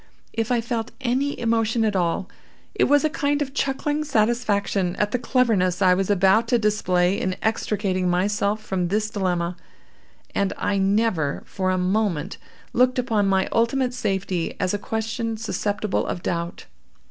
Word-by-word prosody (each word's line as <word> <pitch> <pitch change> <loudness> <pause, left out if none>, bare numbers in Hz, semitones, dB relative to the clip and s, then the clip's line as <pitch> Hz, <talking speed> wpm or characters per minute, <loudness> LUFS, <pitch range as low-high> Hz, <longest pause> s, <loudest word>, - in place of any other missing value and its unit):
If 225 +2 -1
I 240 -1 +2
felt 230 0 -3
any 265 +3 0
emotion 225 0 +1
at 210 -2 0
all, 180 +1 0 0.5
it - - +2
was 290 0 +4
a - - +4
kind 290 0 0
of 275 -2 -3
chuckling 290 +2 -1
satisfaction 210 -7 +1
at 210 0 0
the 250 - 0
cleverness 225 -8 +2
I 185 -2 +5
was 190 +1 0
about 200 +3 +4
to 240 0 +3
display 195 -4 +1
in 185 0 -1
extricating 200 -4 0
myself 200 +3 0
from 185 -4 -1
this 215 +3 -1
dilemma; 180 -3 -1 0.8
and 200 -1 0
I 200 -1 0
never, 195 -7 +1
for 185 -1 -2
a 185 - +1
moment, 185 -2 0 0.4
looked 255 +1 +3
upon 220 -5 +1
my 190 -1 +2
ultimate 245 +2 +1
safety 195 -7 -2
as 185 +1 0
a 205 - -1
question 225 +1 -3
susceptible 215 -2 -2
of 175 - -4
doubt. 170 0 -3
210 Hz, 160 wpm, -23 LUFS, 185-230 Hz, 0.8 s, I